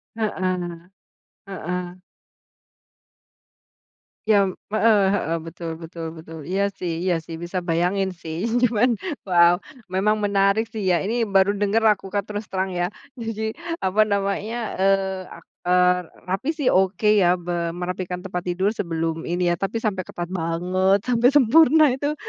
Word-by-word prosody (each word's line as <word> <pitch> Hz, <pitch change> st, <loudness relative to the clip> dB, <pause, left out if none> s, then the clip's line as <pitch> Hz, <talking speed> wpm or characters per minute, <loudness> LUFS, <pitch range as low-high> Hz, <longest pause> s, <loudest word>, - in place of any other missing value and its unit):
Heeh. 185 Hz, -5 st, -3 dB, 0.6 s
Heeh. 180 Hz, -1 st, -4 dB, 2.3 s
Jam 200 Hz, -4 st, +3 dB, 0.2 s
heeh 215 Hz, 0 st, +4 dB
heeh, 165 Hz, -5 st, 0 dB
betul 165 Hz, 0 st, -6 dB
betul 165 Hz, 0 st, -7 dB
betul, 160 Hz, 0 st, -10 dB
iya 200 Hz, +2 st, 0 dB
sih 170 Hz, -1 st, -3 dB
iya 180 Hz, -3 st, +1 dB
sih, 165 Hz, 0 st, -8 dB
bisa 175 Hz, +2 st, -2 dB
bayangin 180 Hz, +2 st, 0 dB
sih. 165 Hz, +4 st, -4 dB, 0.2 s
Cuman, 240 Hz, 0 st, +3 dB, 0.3 s
wow, 175 Hz, -1 st, +5 dB, 0.3 s
memang 200 Hz, +3 st, +2 dB
menarik 200 Hz, +1 st, +3 dB
sih 220 Hz, -, -5 dB
ya, 180 Hz, -1 st, +2 dB
ini 230 Hz, +2 st, 0 dB
baru 195 Hz, 0 st, +4 dB
denger 210 Hz, +2 st, +1 dB
aku 195 Hz, -2 st, -3 dB
Kak 200 Hz, +1 st, -1 dB
terus 210 Hz, +1 st, -5 dB
terang 190 Hz, 0 st, -2 dB
ya. 175 Hz, -1 st, 0 dB, 0.3 s
Jadi, 220 Hz, -1 st, -3 dB, 0.3 s
apa 190 Hz, +3 st, +3 dB
namanya, 200 Hz, +2 st, -1 dB, 0.2 s
eee, 190 Hz, -1 st, +1 dB
ak -, -, -12 dB, 0.2 s
eee, 180 Hz, 0 st, +4 dB, 0.3 s
rapi 195 Hz, +10 st, -1 dB
sih 290 Hz, -5 st, +1 dB
oke 190 Hz, +3 st, +2 dB
ya 180 Hz, -1 st, +4 dB
be 175 Hz, -1 st, -6 dB, 0.2 s
merapikan 180 Hz, 0 st, -4 dB
tempat 180 Hz, -2 st, -5 dB
tidur 185 Hz, +3 st, +1 dB
sebelum 165 Hz, -5 st, -3 dB
ini 175 Hz, 0 st, +1 dB
ya -, -, +1 dB
tapi 195 Hz, +3 st, -3 dB
sampai 195 Hz, -4 st, -1 dB
ketat 175 Hz, 0 st, -5 dB
banget 185 Hz, +3 st, +1 dB
sampai 240 Hz, 0 st, +3 dB
sempurna 310 Hz, +4 st, +6 dB
itu 285 Hz, +4 st, -2 dB
190 Hz, 145 wpm, -23 LUFS, 175-205 Hz, 2.3 s, sempurna